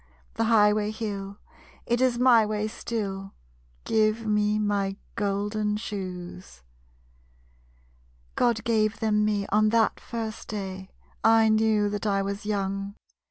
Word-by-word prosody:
The 225 - 0
highway 210 -2 +4
hill, 200 -2 -5 0.5
it 240 +1 0
is 255 -2 +2
my 245 -2 +6
way 210 0 -1
still. 195 -4 -5 0.5
Give 220 +1 +1
me 210 0 +1
my 200 -2 -1 0.2
golden 210 +1 -1
shoes. 185 - -7 1.7
_God 230 -3 +1
gave 220 -1 +1
them 210 -1 +2
me 205 -1 0
on 215 +1 +3
that 225 0 +2
first 225 -2 -6
day 190 -2 -6 0.3
I 225 0 +5
knew 215 -1 +3
that 205 +1 -3
I 195 -1 +1
was 200 +1 -5
young. 195 -1 -2
210 Hz, 120 wpm, -26 LUFS, 200-220 Hz, 1.7 s, my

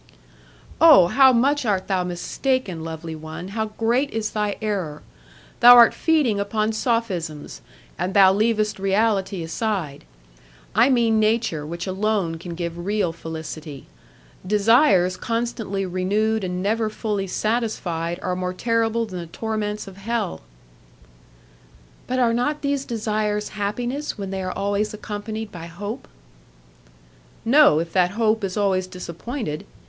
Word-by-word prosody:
"Oh! 310 - +9
how 265 +3 +6
much 275 +4 +2
art 200 -5 0
thou 190 -2 0
mistaken, 180 +1 -2
lovely 160 0 -6
one! 160 +3 -8
How 220 +2 -2
great 235 +6 0
is 220 -3 -3
thy 210 -1 -1
error! 190 -9 -3 0.6
Thou 245 +1 +10
art 235 -1 +8
feeding 295 -11 +1
upon 215 +2 0
sophisms, 195 - -2 0.4
and 180 +3 -2
thou 190 -1 +7
leavest 215 0 +1
reality 195 -2 0
aside; 165 -5 -3 0.7
I 230 +6 +4
mean 230 -4 +3
nature 215 -9 0
which 170 +2 -5
alone 190 -3 -1
can 170 0 -7
give 170 0 -4
real 200 -3 0
felicity. 160 -3 -8 0.6
Desires 200 -2 +3
constantly 230 -4 -2
renewed 205 +4 0
and 180 0 -3
never 220 +2 0
fully 210 -2 -3
satisfied 180 -6 -2
are 180 -1 -1
more 180 0 -3
terrible 230 +1 0
than 185 -4 -7
the 170 - -7
torments 210 +2 -4
of 195 -1 -11
hell." 215 - -3 1.7
"But 255 - -1
are 240 -2 +3
not 295 +6 -1
these 280 -1 -1
desires 215 -2 -2
happiness 240 +8 -3
when 195 -2 -5
they 190 0 -3
are 185 0 -3
always 205 +2 -1
accompanied 215 +1 -6
by 170 -2 -8
hope?" 205 +6 -7 1.4
"No, 270 - +6
if 165 0 -4
that 180 -2 +3
hope 220 -1 +2
is 195 +1 -3
always 190 -2 +1
disappointed. 180 - -6
210 Hz, 135 wpm, -22 LUFS, 180-225 Hz, 1.7 s, Thou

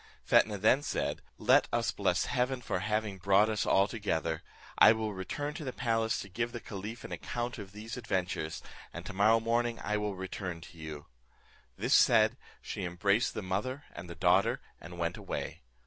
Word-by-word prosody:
Fetnah 105 -2 +4
then 110 +7 +4
said, - - -2 0.2
"Let - - +4
us - - +1
bless - - +1
Heaven 125 0 0
for - - -1
having 105 0 -1
brought 100 +3 +4
us 105 - -1
all 100 +1 +4
together. 85 -8 -2 0.4
I 110 - +9
will 110 -1 -2
return 145 +11 -4
to 155 - -6
the 130 - -3
palace 115 -3 0
to - - -8
give 115 +5 -3
the 120 - -4
caliph 105 +2 -7
an - - -8
account 120 0 -4
of 100 -2 -8
these 110 +3 -7
adventures, 90 -8 -2 0.3
and - - -8
tomorrow 105 +4 +4
morning 115 +1 0
I 105 +1 -1
will 105 -1 -2
return 95 -2 -5
to 85 - -13
you." 75 -2 -7 0.7
This - - +1
said, - - +6 0.3
she - - -4
embraced 100 +5 +1
the 110 - -3
mother 105 +10 -2
and 85 - -8
the 85 - -7
daughter, 95 - +3 0.2
and 85 +1 -10
went 85 -1 -1
away. - - -5
105 Hz, 180 wpm, -31 LUFS, 95-115 Hz, 0.7 s, I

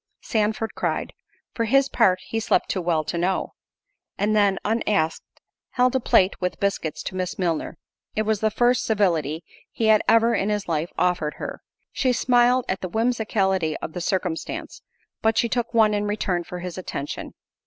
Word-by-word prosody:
Sandford 220 0 -1
cried, - - -2 0.4
"For 230 - -1
his 275 +4 +4
part 195 -9 +3
he 225 - -2
slept 220 -4 +1
too 185 - -1
well 165 -2 +1
to 170 +3 -3
know." 185 +2 -1 0.6
And 210 +1 +1
then 200 -2 +3
(unasked) 210 -7 +1 0.5
held 250 +1 +2
a - - +3
plate 195 -6 +3
with 180 0 -2
biscuits 195 -6 -2
to - - -5
Miss 185 -1 -3
Milner—it 170 +3 -4
was 215 -1 0
the 220 - +2
first 245 +3 +2
civility 170 -7 0 0.3
he 220 -1 0
had 215 -1 +6
ever 230 +1 +5
in 200 - 0
his 210 -1 -1
life 165 0 -1
offered 180 -4 0
her; - - -6 0.3
she 255 -2 +1
smiled 245 0 +3
at 190 - -2
the 185 - -4
whimsicality 200 -6 0
of 155 - -6
the 180 - -4
circumstance, 180 -2 -3 0.4
but 220 0 +2
she 235 - +3
took 240 0 -1
one 220 -2 +4
in 205 0 0
return 190 -4 -1
for 180 +1 -7
his 180 0 -6
attention. 145 -5 -6
205 Hz, 175 wpm, -24 LUFS, 180-225 Hz, 0.6 s, had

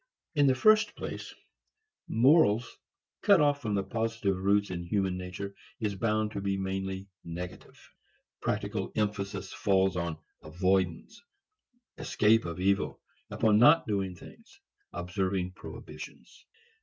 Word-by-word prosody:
In 145 -3 +4
the 130 - +4
first 215 +8 +4
place, - - -6 0.8
morals 120 -2 +3 0.4
cut 200 -3 +6
off 145 -1 +2
from 105 -5 -1
positive 110 -3 -1
roots 100 +2 +1
in 85 -1 -5
man's 95 -3 +1
nature 90 +2 -6 0.3
is 105 -2 -1
bound 110 +1 0
to 100 - -4
be 100 0 -1
mainly 95 0 -3 0.2
negative. 85 +2 -8 0.6
Practical 100 -1 -2
emphasis 100 -2 -2
falls 95 -2 +2
upon 85 -3 -2 0.2
avoidance, 90 - -1 0.8
escape 110 +2 +3
of 85 +1 -5
evil, 100 +1 +1 0.3
upon 105 -1 +3
not 150 +7 +6
doing 100 -5 -2
things, - - -15 0.3
observing 90 +1 -2
prohibitions. - - -11
100 Hz, 120 wpm, -29 LUFS, 95-110 Hz, 0.8 s, cut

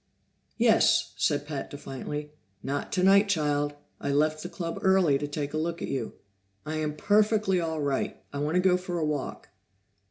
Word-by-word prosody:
"Yes," - - +4
said 145 0 0
Pat 145 -2 -5
defiantly. 145 +2 -6 0.3
"Not 140 +1 -3
tonight, 195 +2 +4
child! 145 -4 +1 0.2
I 140 - -2
left 155 +2 +2
the 175 - -6
Club 165 -2 -5
early 185 -7 +4
to 145 - -3
take 145 0 -4
a 155 - 0
look 170 +2 -2
at - - -4
you." 135 - -3 0.5
"I 155 +1 -3
am 150 -1 -2
perfectly 205 0 +2
all 160 -2 -2
right. 140 -2 -1 0.2
I 140 - -3
want 150 +3 -1
to 180 - +4
go 180 -1 +4
for 180 -1 -4
a 160 - 0
walk." 150 -3 -4
155 Hz, 180 wpm, -28 LUFS, 145-180 Hz, 0.5 s, Yes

